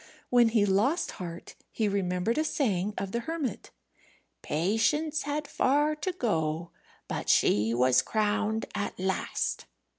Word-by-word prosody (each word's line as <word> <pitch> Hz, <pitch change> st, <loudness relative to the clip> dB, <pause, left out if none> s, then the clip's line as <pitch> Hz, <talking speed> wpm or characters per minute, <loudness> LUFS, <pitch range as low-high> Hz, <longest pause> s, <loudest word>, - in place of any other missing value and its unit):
When 240 Hz, -2 st, +5 dB
he 220 Hz, -2 st, +3 dB
lost 210 Hz, -, +1 dB
heart 170 Hz, -1 st, -7 dB, 0.2 s
he 220 Hz, -, 0 dB
remembered 195 Hz, +4 st, 0 dB
a -, -, +2 dB
saying 210 Hz, -, 0 dB
of 195 Hz, 0 st, -3 dB
the 235 Hz, -, -1 dB
hermit: 295 Hz, -, -4 dB, 0.7 s
"Patience 225 Hz, -, +1 dB
had 290 Hz, +1 st, -3 dB
far 295 Hz, +3 st, +2 dB
to 335 Hz, +5 st, -2 dB
go, 165 Hz, -, -1 dB, 0.4 s
but -, -, -4 dB
she 105 Hz, +2 st, +3 dB
was 125 Hz, +1 st, +4 dB
crowned 215 Hz, +1 st, 0 dB
at 205 Hz, -3 st, -3 dB
last." 190 Hz, +1 st, -1 dB
215 Hz, 130 wpm, -28 LUFS, 180-280 Hz, 0.7 s, When